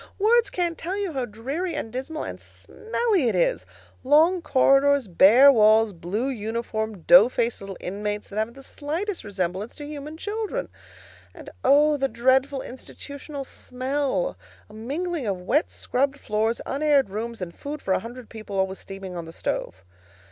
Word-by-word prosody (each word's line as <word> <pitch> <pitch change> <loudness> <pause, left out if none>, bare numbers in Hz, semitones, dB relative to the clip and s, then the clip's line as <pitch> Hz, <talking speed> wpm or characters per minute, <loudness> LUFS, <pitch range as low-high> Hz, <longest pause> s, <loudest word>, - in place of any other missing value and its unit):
Words 445 +1 +3
can't 345 -3 -2
tell 370 +4 -3
you 395 -5 -2
how 260 -3 -1
dreary 275 - -4
and 225 -6 -5
dismal 270 +5 -4
and - - -7
smelly 440 - -1
it - - -1
is: - - +1 0.4
long 320 +7 +4
corridors, 275 -3 +3
bare 220 +10 +7
walls; 220 -2 +5
blue 190 +9 -3
uniformed, 220 -4 -4
dough 260 -1 +8
faced 240 -3 -1
little 195 -1 -7
inmates 205 +2 -4
that 205 - -8
haven't 225 +3 -2
the 270 - -12
slightest 335 +9 -4
resemblance 190 +1 -3
to 290 - -8
human 300 +1 -7
children. 435 +6 -3 0.7
And - - -11
oh, 295 +2 +5
the 270 -1 +1
dreadful 265 +2 +1
institution 280 +2 -8
smell! 270 - -2 0.3
A - - -15
mingling 285 +6 -3
of 195 -2 -1
wet 290 - +1
scrubbed 275 +2 -1
floors, 220 +2 -1
unaired 280 -6 +2
rooms, 230 +3 -4
and 175 -2 -6
food 295 - -6
for 190 - -1
a - - +2
hundred 235 +3 -9
people 215 -3 -7
always 190 0 -1
steaming 195 -1 -8
on 170 -1 -5
the 165 - -9
stove. 95 - -4
260 Hz, 160 wpm, -24 LUFS, 215-300 Hz, 0.7 s, dough